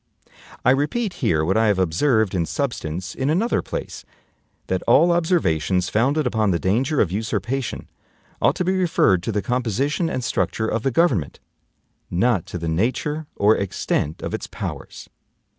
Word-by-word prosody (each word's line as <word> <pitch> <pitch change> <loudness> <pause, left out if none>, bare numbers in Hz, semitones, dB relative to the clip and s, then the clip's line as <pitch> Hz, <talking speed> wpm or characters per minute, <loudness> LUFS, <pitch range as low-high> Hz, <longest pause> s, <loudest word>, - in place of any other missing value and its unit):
I 125 - +6
repeat 165 - 0
here 80 - +2
what 95 +6 +1
I 110 0 +3
have 100 -2 +2
observed 100 - +2
in 85 -3 0
substance 90 - -3
in 135 +2 -2
another 195 +10 +1
place, - - -6 0.6
that 95 -1 -1
all 155 +9 +5
observations 95 - +1
founded 140 +7 +1
upon 110 -4 +1
the 90 - +2
danger 125 - 0
of 90 - +2
usurpation 115 +3 -3 0.5
ought - - +3
to 180 - -2
be 185 +1 +1
referred 165 - +2
to 105 - -3
the 105 -1 -1
composition 130 - 0
and 130 - -3
structure 115 -1 -1
of 115 - -1
the 135 - +1
government, 125 - +1 0.7
not 95 0 +1
to - - -5
the 85 -1 -4
nature 130 - -1
or 105 +2 +4
extent 85 -5 -2
of - - -4
its - - -4
powers. - - -7
115 Hz, 160 wpm, -22 LUFS, 95-145 Hz, 0.7 s, I